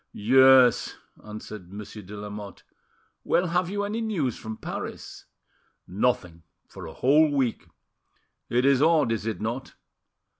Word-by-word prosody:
"Yes," 130 +2 +5 0.3
answered 105 -3 -10
Monsieur 105 +1 -9
de 100 +2 -10
Lamotte. 105 -1 -8 0.6
"Well, 180 - +1
have 180 +1 0
you 205 +1 -2
any 210 +3 -3
news 170 - -1
from 110 0 -8
Paris?" - - -7 0.6
"Nothing 90 -4 -1 0.3
for - - -10
a 80 - -9
whole 150 +4 +4
week: 135 -5 -1 0.8
it 125 +2 +1
is 140 -1 +4
odd, 155 -6 +3
is 115 -1 -2
it 110 - -3
not?" 120 +5 -5
125 Hz, 135 wpm, -25 LUFS, 105-145 Hz, 0.8 s, Yes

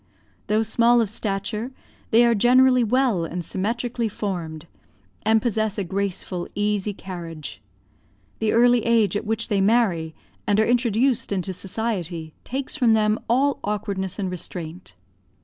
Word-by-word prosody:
Though 215 +1 +2
small 235 +2 +3
of 220 -4 0
stature, 210 +3 -3 0.4
they 235 +1 +5
are 235 - +4
generally 250 +3 +5
well 235 -5 +2
and 170 +1 -4
symmetrically 230 +5 -2
formed, 170 -6 -4 0.6
and 220 0 +2
possess 220 -3 0
a 200 - 0
graceful, 190 -1 -2
easy 205 0 0
carriage. 165 - -8 0.8
The 220 -1 +1
early 240 0 +4
age 225 -5 +2
at 205 - -2
which 225 +1 -1
they 200 -3 +2
marry, 195 -7 +2 0.3
and 205 0 +3
are 220 - +4
introduced 240 +1 +1
into 190 -1 -2
society, 180 -5 -3
takes 265 +2 -4
from 245 -7 +3
them 215 0 +2
all 270 +4 +2
awkwardness 200 -2 -3
and 190 -3 -2
restraint. 170 - -7
210 Hz, 140 wpm, -23 LUFS, 185-235 Hz, 0.8 s, they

